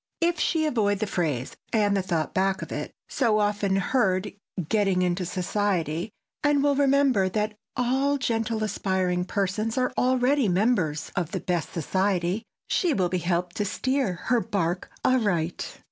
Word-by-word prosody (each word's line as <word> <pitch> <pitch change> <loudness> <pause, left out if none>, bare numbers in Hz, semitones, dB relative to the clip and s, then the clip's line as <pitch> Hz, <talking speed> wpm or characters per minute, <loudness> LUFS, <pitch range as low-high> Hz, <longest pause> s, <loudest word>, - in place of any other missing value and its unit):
If 340 -1 +1
she 320 -1 +1
avoid 215 -8 +1
the 215 - -1
phrase—and 180 - -1
the 195 - +2
thought 170 -4 -2
back 190 0 +1
of - - -9
it—so 230 -5 -1
often 205 -2 +1
heard, 195 -2 +1 0.3
"getting 195 -3 +2
into 180 0 0
society," 180 -2 -1 0.3
and 290 -1 +3
will 285 0 +4
remember 275 -8 +3
that 210 +2 -1 0.2
all 265 +3 +2
gentle 225 -4 -1
aspiring 185 -4 0
persons 200 +4 -1
are 255 0 +1
already 255 -1 +3
members 180 -6 +1
of 175 -4 -2
the - - -1
best 175 -3 -2
society, 185 +3 0 0.3
she 340 -6 +1
will 185 -4 +1
be 185 - 0
helped 175 0 -1
to 210 - 0
steer 205 +4 0
her 235 +8 0
bark 180 -4 -2 0.2
aright. 190 -10 0
200 Hz, 145 wpm, -26 LUFS, 180-245 Hz, 0.3 s, will